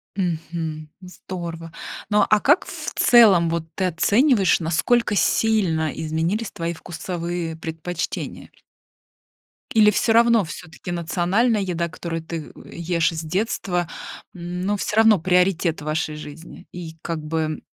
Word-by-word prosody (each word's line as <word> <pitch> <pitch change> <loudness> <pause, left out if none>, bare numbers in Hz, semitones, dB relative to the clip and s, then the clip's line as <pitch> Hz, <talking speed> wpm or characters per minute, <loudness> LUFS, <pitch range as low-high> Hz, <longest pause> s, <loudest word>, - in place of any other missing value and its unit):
Мгм. 165 -4 -3
Здорово. 170 -3 -7 0.4
Ну, 210 0 +4
а 215 - +5
как 295 +6 +4
в - - -6
целом 200 -9 +6
вот 165 0 -1
ты 190 - 0
оцениваешь, 205 - +3
насколько 205 +7 +1
сильно 190 -8 +2
изменились 165 +8 -2
твои 170 0 -3
вкусовые 170 -1 -5
предпочтения? 165 +1 -5 1.2
Или 215 -2 +6
всё 225 +2 +2
равно 235 -1 +5
все-таки 160 -1 -8
национальная 180 +7 +1
еда, 175 -3 -1
которую 165 0 -5
ты 160 -2 -6
ешь 170 -1 -1
с 160 -1 -4
детства, 180 -1 -1 0.4
но 180 +3 -3
всё 210 - -3
равно 220 -3 +6
приоритет 180 -1 +2
в - - -9
вашей 155 0 -2
жизни. 155 +4 -10
И 170 -2 -7
как 165 -2 -3
бы, 155 0 -2
175 Hz, 125 wpm, -22 LUFS, 160-200 Hz, 1.2 s, целом